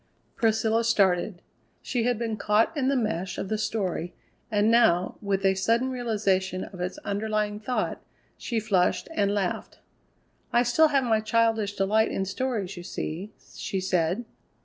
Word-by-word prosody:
Priscilla 225 0 +2
started. 195 -4 +2 0.4
She 240 -3 -1
had 245 -2 +1
been 225 -1 -2
caught 210 +6 +2
in 270 -3 0
the 275 - +2
mesh 210 -7 -1
of 190 - -4
the 215 - 0
story, 195 -5 -2 0.3
and 210 0 +3
now 185 -6 +4
with 195 -1 -1
a 190 - +5
sudden 230 +7 +1
realization 200 -6 0
of 185 -3 -9
its 180 +1 -3
underlying 210 0 -1
thought 245 +4 -2 0.3
she 230 - -2
flushed 195 -5 +1
and 200 -8 +1
laughed. 195 -3 -2 0.7
"I 240 - +4
still 250 +7 +4
have 280 -3 +2
my 225 -3 +2
childish 220 -2 +1
delight 210 +3 +2
in 195 - -2
stories, 200 -2 -2
you 175 - -7
see," 175 +3 -5 0.2
she 195 - -3
said. 185 +3 0
215 Hz, 155 wpm, -26 LUFS, 190-230 Hz, 0.7 s, a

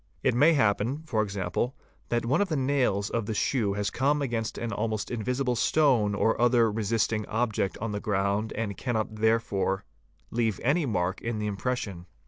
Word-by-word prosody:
It - - +3
may 145 +7 +5
happen, 120 +3 +1
for 115 -8 0
example, 100 +4 -2 0.3
that 120 -1 0
one 140 +10 +2
of 205 - 0
the 160 - 0
nails 130 -7 +1
of 115 -3 -1
the 110 - -2
shoe 105 -3 +1
has 105 0 -1
come 140 +3 +1
against 115 -6 -2
an 115 -1 -3
almost 110 0 -2
invisible 125 +2 -1
stone 120 -6 +3
or 110 +3 +1
other 120 -2 +4
resisting 110 0 0
object 110 -3 -1
on 110 0 -3
the 105 - -2
ground 100 0 0
and 105 -2 -3
cannot 110 -3 -2
therefore 105 -3 +1 0.5
leave 115 -4 0
any 145 +4 +2
mark 95 -4 -1
in 115 -1 -2
the 105 - -2
impression. 100 -3 -3
110 Hz, 175 wpm, -27 LUFS, 105-125 Hz, 0.5 s, may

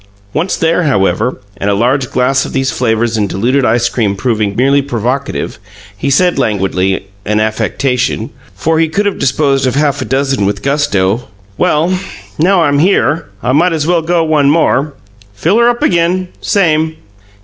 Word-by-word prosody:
Once 170 +5 -1
there, 165 +2 +1
however, 125 - 0 0.2
and 100 - -1
a 100 - +2
large 125 +5 +1
glass 135 +2 +1
of - - -7
these 135 -1 0
flavors 115 -1 0
and 105 -2 0
diluted 125 +8 0
ice 120 0 +2
cream 110 -4 -1
proving 105 -2 -1
merely 140 +4 +3
provocative, 130 +1 -3 0.4
he 105 +8 -2
said, 175 +6 +2
languidly 95 -2 0 0.2
an 105 +1 0
affectation, 120 +2 -1 0.2
for 160 0 0
he 165 -1 +2
could 200 +6 -1
have 205 - -1
disposed 135 0 +1
of 125 - -1
half 145 -1 +1
a - - -3
dozen 135 0 0
with 100 0 -3
gusto: 120 -6 0 0.3
"Well, 170 - +1 0.4
now 180 +2 +3
I'm 145 -2 +2
here, 165 -3 +2 0.2
I 125 - +1
might 165 +6 +3
as 155 -2 -1
well 170 0 +2
go 170 +1 +1
one 150 -3 +2
more. 150 -2 +1 0.4
Fill 170 - +1
'er 235 0 +5
up 240 +4 -1
again. 180 - +1
Same." 160 -4 +1
135 Hz, 170 wpm, -13 LUFS, 115-160 Hz, 0.4 s, er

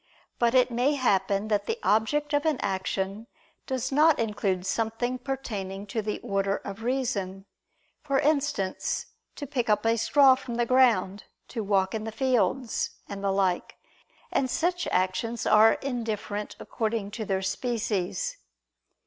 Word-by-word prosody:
But 235 +1 +2
it 250 -1 +4
may 250 +5 +2
happen 200 -5 +1
that 210 -2 0
the 455 - -1
object 290 +8 +1
of 290 - +2
an 315 -4 +1
action 195 +2 -2 0.4
does 260 -2 -2
not 305 +3 +5
include 200 -4 -1
something 225 +4 -1
pertaining 205 -8 -4
to 225 - 0
the 210 0 -3
order 195 0 0
of 200 +2 -8
reason; 225 -7 -2 0.6
for 275 -2 0
instance, 280 -10 0 0.3
to 290 - -6
pick 250 -5 -2
up 210 +1 +2
a 230 0 +3
straw 275 +2 +6
from 255 -2 -5
the 240 0 +1
ground, 230 -6 +3 0.2
to 225 -3 -3
walk 195 -2 +1
in 220 -1 -3
the 220 - -4
fields, 255 0 0 0.2
and 200 0 -7
the 200 - +1
like: 190 -2 0 0.6
and 260 - +1
such 350 +5 0
actions 220 +5 -1
are 215 +1 +6
indifferent 220 -5 -4
according 220 -2 -3
to 220 +1 -4
their 195 -2 -1
species. 230 - -2
225 Hz, 150 wpm, -27 LUFS, 200-260 Hz, 0.6 s, straw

